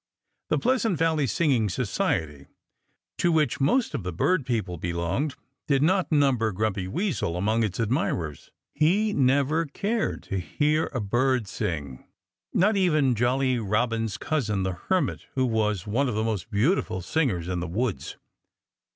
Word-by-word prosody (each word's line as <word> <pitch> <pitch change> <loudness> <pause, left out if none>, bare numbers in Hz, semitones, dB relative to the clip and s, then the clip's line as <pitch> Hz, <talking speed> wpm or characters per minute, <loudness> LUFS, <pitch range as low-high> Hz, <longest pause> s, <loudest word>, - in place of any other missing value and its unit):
The - - +2
Pleasant 235 -7 +1
Valley 160 -3 +1
Singing 125 -4 +1
Society, 80 - -2 0.7
to 175 - +3
which 150 -5 +1
most 225 - +2
of - - -2
the 90 0 -4
bird 140 - +1
people 105 -8 -1
belonged, 85 - -2 0.3
did 140 -2 +3
not 185 +3 +2
number 135 -7 +3
Grumpy 100 -1 -1
Weasel 155 - -1
among 110 +5 +1
its 105 -2 -1
admirers. 105 - -1 0.2
He 205 +7 +2
never 145 +4 +2
cared 215 +10 -2
to 95 - -3
hear 150 - 0
a 125 - -2
bird 120 +2 +1
sing 75 - -4 0.5
not 205 +4 +3
even 155 -9 +3
Jolly 125 +2 +1
Robin's 115 +1 0
cousin 105 -11 -1
the 95 - 0
Hermit, 150 - -1
who 130 -1 +2
was 105 -5 0
one 125 +6 0
of 115 - -3
the 110 - 0
most 110 -3 -2
beautiful 110 - +1
singers 105 - 0
in 90 -1 -2
the 90 - -3
woods. 110 +5 -3
120 Hz, 150 wpm, -26 LUFS, 100-150 Hz, 0.7 s, to